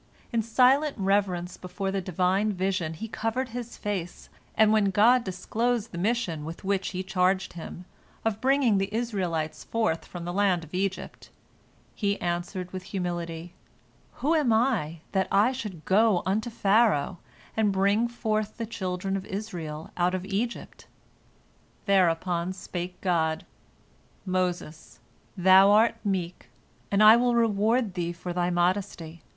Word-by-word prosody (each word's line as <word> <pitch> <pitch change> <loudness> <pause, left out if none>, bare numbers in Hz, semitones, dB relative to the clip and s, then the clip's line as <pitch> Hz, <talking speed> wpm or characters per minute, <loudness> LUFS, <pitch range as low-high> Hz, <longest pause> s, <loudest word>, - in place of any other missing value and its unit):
In 230 - +2
silent 260 +6 +3
reverence 190 -3 0
before 190 +2 -4
the 195 0 -1
Divine 185 +3 +1
vision 185 -4 -1
he 225 +8 -6
covered 225 +4 -2
his 240 0 -7
face, 190 -4 -5 0.3
and 215 0 +5
when 210 -2 +3
God 230 +6 +4
disclosed 225 +4 -2
the 170 - -6
mission 195 -6 -1
with 165 +5 -8
which 195 -1 0
He 185 0 -3
charged 185 0 +1
him, 175 +1 -8 0.4
of 220 -1 -1
bringing 260 -6 +3
the 195 +1 -2
Israelites 190 -9 -2
forth 220 -8 -1
from 175 -1 -8
the 175 - -4
land 190 -3 +2
of 160 - -14
Egypt, 190 +1 -3 0.6
he 200 -2 -1
answered 175 +1 -3
with 185 - -4
humility, 175 -3 -4 0.7
"Who 305 +4 +3
am 300 -7 +2
I, 220 - +1
that 190 -1 +1
I 210 +5 +4
should 210 -11 -7
go 205 -1 +3
unto 215 +5 0
Pharaoh, 200 -7 +2 0.4
and 215 -2 +2
bring 200 +4 +2
forth 215 -3 -2
the 230 - -3
children 195 -3 -3
of 195 0 -4
Israel 170 -7 -6
out 180 +1 +1
of 185 0 -4
Egypt?" 210 +5 -4 1.0
Thereupon 180 -2 +2
spake 180 -1 -6
God, 160 -4 0 0.8
"Moses, 180 -4 -3 0.4
thou 190 +2 +7
art 215 +3 +5
meek, 185 -4 -3 0.4
and 200 +1 +3
I 215 +2 +9
will 245 0 +2
reward 225 0 +2
thee 175 -1 -2
for 175 +1 -6
thy 175 0 0
modesty. 175 -2 -1
195 Hz, 145 wpm, -27 LUFS, 175-220 Hz, 1.0 s, I